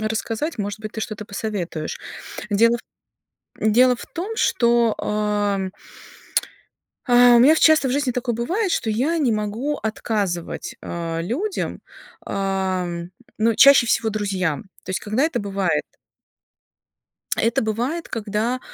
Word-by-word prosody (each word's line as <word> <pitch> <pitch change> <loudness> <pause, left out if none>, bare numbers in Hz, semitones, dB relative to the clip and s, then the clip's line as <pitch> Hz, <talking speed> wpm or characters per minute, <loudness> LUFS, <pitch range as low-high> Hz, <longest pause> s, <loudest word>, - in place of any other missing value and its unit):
рассказать, 225 +6 -2
может 205 +1 -3
быть, 215 -1 -6
ты 220 - -5
что-то 215 -1 -5
посоветуешь. 195 -7 -4 0.5
Дело 230 +3 +4
в - - -11 0.9
дело 250 +3 +5
в - - -10
том, 380 +6 -5
что, 235 - +3
ам 205 -2 0 1.4
А, 245 -1 +7
у - - +7
меня 270 +6 +7
в - - 0
часто 315 -4 +5
в - - -1
жизни 280 -1 +1
такое 240 -1 -2
бывает, 360 - -1
что 225 - 0
я 270 +10 +1
не 265 -7 +2
могу 220 +8 -2
отказывать, 205 -5 -3
а, 165 -1 -4
людям, 335 - -3 0.5
ам, 185 -3 -2 0.3
ну, 225 +1 +3
чаще 275 -2 +7
всего 225 -1 +1
друзьям. 190 -7 -1 0.2
То 185 - -6
есть 190 - -1
когда 215 +6 -1
это 325 - 0
бывает? 195 -3 0 1.5
Это 230 +1 +1
бывает, 245 +10 -2
когда, 225 +3 -2
220 Hz, 135 wpm, -22 LUFS, 200-250 Hz, 1.5 s, А